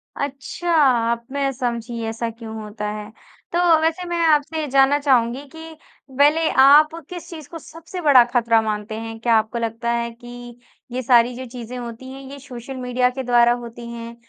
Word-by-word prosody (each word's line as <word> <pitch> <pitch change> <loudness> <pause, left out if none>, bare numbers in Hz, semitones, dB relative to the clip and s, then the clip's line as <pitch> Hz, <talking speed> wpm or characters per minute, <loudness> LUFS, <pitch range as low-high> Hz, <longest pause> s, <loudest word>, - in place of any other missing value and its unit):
अच्छा, 280 +5 -4 0.4
अब 235 0 -3
मैं 280 -1 -1
समझी 235 -2 -4
ऐसा 230 +1 -3
क्यों 225 -1 -9
होता 210 0 -5
है। 210 0 -7 0.4
तो 345 - 0 0.2
वैसे 325 +3 0
मैं 345 0 -2
आपसे 305 +1 +2
ये 300 - -3
जानना 275 +1 +4
चाहूँगी 260 -1 +1
कि 320 +3 -11 0.4
पहले 300 +3 +4
आप 290 +3 +7 0.2
किस 355 -2 -8
चीज़ 315 -4 -9
को 330 - -8
सबसे 335 +4 -9
बड़ा 280 -6 +7
खतरा 230 -2 +3
मानते 215 0 -4
हैं? 225 0 -7
क्या 230 0 +2
आपको 220 +2 0
लगता 230 +1 -2
है 235 0 -1
कि 240 0 -11 0.3
ये 255 +1 -3
सारी 240 -1 +4
जो 260 +1 -7
चीज़ें 245 0 -7
होती 240 +2 -8
हैं, 270 +1 -9
ये 280 - -9
सोशल 255 0 -9
मीडिया 250 0 0
के 265 +1 -5
द्वारा 240 -1 +4
होती 235 0 -9
हैं, 235 0 -8
245 Hz, 185 wpm, -21 LUFS, 235-280 Hz, 0.4 s, आप